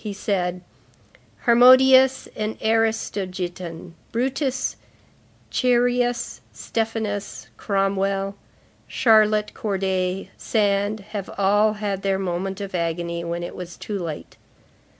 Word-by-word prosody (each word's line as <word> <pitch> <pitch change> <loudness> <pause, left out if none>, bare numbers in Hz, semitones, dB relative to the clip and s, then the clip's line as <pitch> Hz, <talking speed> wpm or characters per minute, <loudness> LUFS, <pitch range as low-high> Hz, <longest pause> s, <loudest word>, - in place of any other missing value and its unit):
He 210 -2 -4
said:— 180 -3 -2 0.8
"Harmodius 260 +2 +6
and 215 0 -3
Aristogiton, 185 -6 -2 0.2
Brutus, 260 +2 -1 0.8
Chereas, 245 -1 +1
Stephanus, 220 -3 -3
Cromwell, 195 -1 0 0.5
Charlotte 215 -2 +3
Corday, 190 -2 -2
Sand, 205 -1 0
have 200 -3 -5
all 205 +2 +3
had 205 -2 -3
their 195 -1 0
moment 190 +1 -3
of 195 -1 -6
agony 170 0 -2
when 170 0 -3
it 175 - -6
was 175 -2 -8
too 205 -2 -4
late. 165 -4 -6
200 Hz, 95 wpm, -23 LUFS, 185-225 Hz, 0.8 s, Harmodius